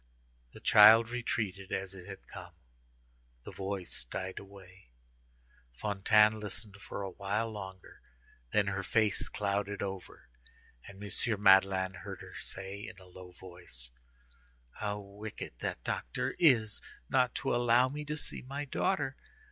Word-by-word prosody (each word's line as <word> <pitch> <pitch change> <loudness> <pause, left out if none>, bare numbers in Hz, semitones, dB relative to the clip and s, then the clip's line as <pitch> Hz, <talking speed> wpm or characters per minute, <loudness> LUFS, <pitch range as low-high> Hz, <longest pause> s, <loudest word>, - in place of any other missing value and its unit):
The - - -11
child 110 +2 +8
retreated 100 -6 -2
as 95 0 -2
it 90 -1 -11
had 95 -1 -9
come; 90 -3 -10 0.9
the - - -8
voice 95 -8 -3
died 95 +9 -5
away. 95 -3 -15 0.8
Fantine 105 - +4
listened 105 -1 -4
for 100 0 -6
a 95 - -4
while 105 +4 -2
longer, 95 -3 -9 0.5
then 105 -1 +3
her 100 0 -1
face 105 -1 +1
clouded 100 0 -1
over, 95 -2 -7 0.6
and 100 +1 -11
M. 105 +1 -2
Madeleine 95 -1 +5
heard - - -8
her - - -11
say, 95 +1 -4
in 110 -3 -10
a 95 - -15
low 90 0 -12
voice: 85 -10 -10 0.8
"How 105 -1 -3
wicked 100 - -8
that - - -4
doctor - - -2
is 120 -10 +4 0.3
not 125 -2 +2
to - - 0
allow 120 +1 +4
me 145 +3 -5
to 150 +1 -3
see - - -1
my 140 +3 -5
daughter! 135 -1 0
100 Hz, 140 wpm, -32 LUFS, 95-110 Hz, 0.9 s, child